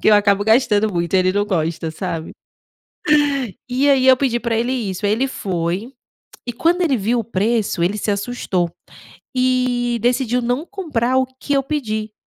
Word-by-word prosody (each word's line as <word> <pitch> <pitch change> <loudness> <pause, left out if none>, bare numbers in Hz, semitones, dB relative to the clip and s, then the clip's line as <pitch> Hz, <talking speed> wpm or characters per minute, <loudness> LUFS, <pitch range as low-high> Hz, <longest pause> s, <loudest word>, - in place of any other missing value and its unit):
que - - +3
eu 210 - +7
acabo 205 -1 +3
gastando 220 -2 +3
muito, 170 +1 -2
ele 185 0 +3
não 205 +1 +1
gosta, 165 -4 -2
sabe? 165 -1 -5 1.4
E 260 +3 +1
aí, 265 -2 +4
eu 260 - +7
pedi 250 -2 0
para 230 -1 -1
ele 240 +2 0
isso. 205 -5 -2
Aí, 205 - +2
ele 255 +5 +1
foi 185 +2 -3 0.5
e 240 - -4
quando 340 +8 +1
ele 285 -7 +2
viu 235 +4 0
o 225 - -5
preço, 215 -3 0
ele 200 +4 0
se 210 - -2
assustou 200 -4 -1 0.7
e 250 -2 +1
decidiu 245 0 +1
não 245 +7 -1
comprar 280 - -1
o 260 - +3 0.2
que 285 - -3
eu 275 - +2
pedi, 220 -7 -3
230 Hz, 175 wpm, -19 LUFS, 200-255 Hz, 1.4 s, eu